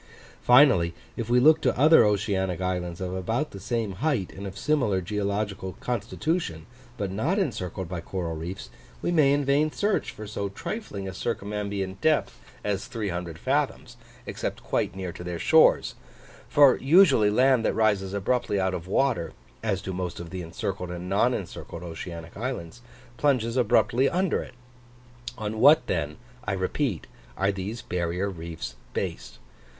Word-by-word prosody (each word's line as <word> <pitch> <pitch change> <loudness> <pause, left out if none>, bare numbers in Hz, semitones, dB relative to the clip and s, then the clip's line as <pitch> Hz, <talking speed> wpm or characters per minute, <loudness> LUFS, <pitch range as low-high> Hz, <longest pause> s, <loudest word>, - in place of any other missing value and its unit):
Finally, 125 - +5 0.2
if 115 -1 -4
we 125 +1 +5
look 155 +5 +6
to - - +1
other 155 +5 +7
oceanic 100 -3 0
islands 90 -2 -2
of 90 -1 -3
about 110 +11 -2
the 100 - -8
same 115 +1 -2
height 135 - 0
and 100 +1 -7
of 95 - -8
similar 125 -11 +1
geological 100 0 -2
constitution, 120 - -2 0.3
but 100 -3 -2
not 135 - 0
encircled 95 - -2
by 90 -1 -5
coral 85 -2 -4
reefs, 85 +5 -6 0.3
we - - +1
may 150 -5 +4
in 145 0 +2
vain 145 +3 +2
search 205 +4 0
for 110 -1 -8
so 100 -1 -3
trifling 100 - -5
a 95 - -5
circumambient 100 -2 -3
depth 155 -1 +1 0.2
as 100 -2 -2
30 90 -7 -4
fathoms, 80 - -1 0.3
except - - -4
quite - - -1
near 95 -2 -4
to 90 - -9
their 90 -1 -4
shores; - - +4 0.6
for 145 -3 +6
usually 140 - +5
land 125 +2 +4
that - - +1
rises 100 -4 +2
abruptly 100 +1 0
out 95 -1 0
of 90 -1 -5
water, 115 -6 +1 0.3
as 100 -4 -1
do 95 - -4
most 90 -1 -4
of 85 -1 -8
the 95 -1 -4
encircled 90 +2 -4
and 90 0 -6
non 105 +6 +3
encircled 90 -5 -6
oceanic 85 0 -7
islands, 120 -3 -5 0.4
plunges 125 -4 +1
abruptly 125 +1 +3
under 185 -1 0
it. 130 - -11 0.8
On 110 0 -4
what 145 0 +7
then, 75 -7 -2 0.3
I 105 - -2
repeat, 95 - -1 0.3
are 100 +1 +2
these 100 +5 -5
barrier 90 +3 -2
reefs 85 -2 -7 0.2
based? - - -4
100 Hz, 155 wpm, -26 LUFS, 90-125 Hz, 0.8 s, other